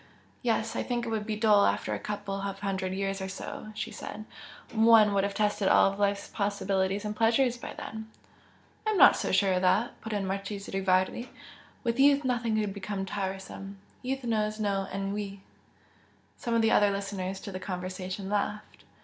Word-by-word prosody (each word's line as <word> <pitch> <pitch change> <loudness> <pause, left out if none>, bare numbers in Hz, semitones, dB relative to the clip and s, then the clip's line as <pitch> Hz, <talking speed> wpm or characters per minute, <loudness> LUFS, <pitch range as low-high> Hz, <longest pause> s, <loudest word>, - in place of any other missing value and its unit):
"Yes 225 -2 0
I - - 0
think 240 -1 -2
it - - -3
would 220 -1 -2
be 215 - -1
dull 210 -1 +5
after - - +1
a - - -2
couple 205 -1 -4
of 195 0 -4
hundred 190 -2 -2
years 195 0 -2
or 190 - -3
so" 195 - -7
she 215 +1 -4
said 215 0 -7 0.5
"One 220 -2 +6
would 195 -1 +2
have 200 0 -2
tested 210 -1 +1
all 195 - +5
life's 200 0 0
possibilities 200 -1 -1
and 210 0 -3
pleasures 235 +3 +3
by 240 - -8
then." 220 0 -7 0.8
"I - - +4
am 430 - +1
not 310 - +8
so - - -2
sure 195 0 +3
of 180 - +1
that!" 190 +6 +1
put 225 - -6
in 205 -2 -1
the - - -3
Marchese 195 +1 -4
Rivardi 190 +5 +1 0.5
"With 235 0 -1
youth 285 +1 +6
nothing 240 -3 0
could 205 -2 -1
become 200 -1 -4
tiresome 195 0 -5 0.2
youth 265 +1 -3
knows 215 -2 0
no 200 -2 0
ennui." 195 0 -4 0.9
Some 235 -1 -2
of 230 - +3
the 225 - +4
other 205 - +5
listeners 195 -1 -3
to 200 - -7
the 185 - -5
conversation 185 +1 -5
laughed. 210 +1 -3
205 Hz, 185 wpm, -29 LUFS, 195-220 Hz, 0.9 s, not